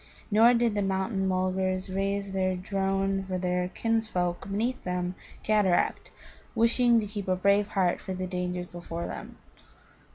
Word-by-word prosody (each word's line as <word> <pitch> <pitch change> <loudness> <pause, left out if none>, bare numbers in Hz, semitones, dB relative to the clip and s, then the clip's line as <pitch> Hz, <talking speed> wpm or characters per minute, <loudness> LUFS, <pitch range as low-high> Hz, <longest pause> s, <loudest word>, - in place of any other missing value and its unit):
Nor 230 +4 +6
did 235 -2 +2
the 205 - 0
mountain 190 0 0
mulgars 185 0 0
raise 195 +1 -2
their 185 -1 0
drone 195 +1 -1
for 185 -1 -2
their 180 0 0
kinsfolk 200 -4 -1
beneath 230 +6 -1
the 180 0 -2 0.3
cataract, 210 -4 +2 0.5
wishing 235 +1 +4
to 215 - -2
keep 205 -1 -5
a 185 - +2
brave 200 +2 +3
heart 180 -2 +2
for 190 - -5
the 185 0 -3
dangers 180 -1 -3
before 170 -1 -6
them. - - -7
190 Hz, 150 wpm, -28 LUFS, 185-205 Hz, 0.5 s, Nor